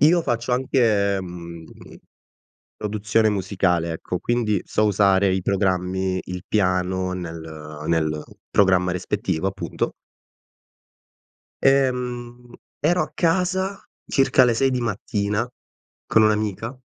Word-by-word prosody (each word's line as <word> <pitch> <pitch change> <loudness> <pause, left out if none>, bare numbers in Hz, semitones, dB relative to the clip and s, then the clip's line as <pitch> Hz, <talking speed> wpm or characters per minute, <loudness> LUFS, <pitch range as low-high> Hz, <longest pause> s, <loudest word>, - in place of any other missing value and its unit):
io 165 +4 +5
faccio 120 -5 -2
anche, 110 -6 +2
mhmm, 85 -2 -8 1.1
produzione 110 +1 +1
musicale, 90 -4 0
ecco, 90 +2 -4
quindi 110 -4 0
so 110 - 0
usare 100 -2 +3
i 95 - 0
programmi, 95 -1 0
il 90 0 -6
piano 95 -2 0
nel 85 -3 -5 0.5
nel 80 -2 0 0.3
programma 90 -2 +3
rispettivo, 90 -1 -2
appunto. 95 -3 -3 1.7
Ehm, 125 -2 0 0.3
ero 175 +5 +2
a - - -6
casa, 185 +3 +1 0.3
circa 135 -1 +4
alle 120 -2 +4
6 135 +3 +2
di 125 -1 -1
mattina, 105 -1 -1 0.6
con 110 - +4
un'amica 110 +3 0
105 Hz, 105 wpm, -23 LUFS, 90-120 Hz, 1.7 s, io